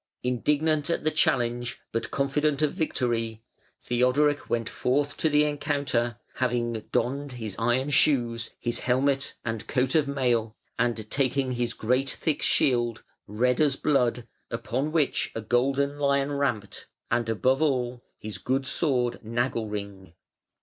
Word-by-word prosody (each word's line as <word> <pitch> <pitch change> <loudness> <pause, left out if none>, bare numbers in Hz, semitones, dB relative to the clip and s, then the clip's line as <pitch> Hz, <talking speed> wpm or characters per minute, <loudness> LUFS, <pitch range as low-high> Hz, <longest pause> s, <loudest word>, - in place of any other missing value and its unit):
Indignant 150 +5 +1
at 170 - 0
the 155 - +2
challenge, 120 -5 +1
but 115 - -2
confident 140 +2 0
of 150 - +2
victory, 115 - -1 0.4
Theodoric 130 +4 +1
went 115 -1 0
forth 145 +3 0
to 160 - +2
the 150 0 +4
encounter, 140 -5 -1 0.2
having 120 -2 0 0.2
donned 140 +2 -1
his 110 -5 -5
iron 125 +5 +1
shoes, 120 -5 +3
his 120 -1 -1
helmet 135 +2 +1
and 115 -2 -3
coat 130 -1 +1
of 155 -3 +3
mail, 120 -5 0 0.2
and 115 -3 0
taking 135 -1 +1
his 120 -1 -1
great 130 +4 +1
thick 155 +1 -1
shield, 120 -3 +2 0.2
red 125 +6 +1
as 145 -3 +3
blood, 125 -5 +1 0.2
upon 125 +5 -2
which 155 -4 +1
a 115 - -2
golden 135 +5 +1
lion 140 0 +2
ramped, 120 -8 -2 0.2
and 115 -1 +1
above 130 +5 +2
all, 125 -5 0
his 110 -1 -7
good 135 +1 -1
sword 125 -6 +1
Nagelring. 105 -6 -3
125 Hz, 135 wpm, -27 LUFS, 120-140 Hz, 0.4 s, the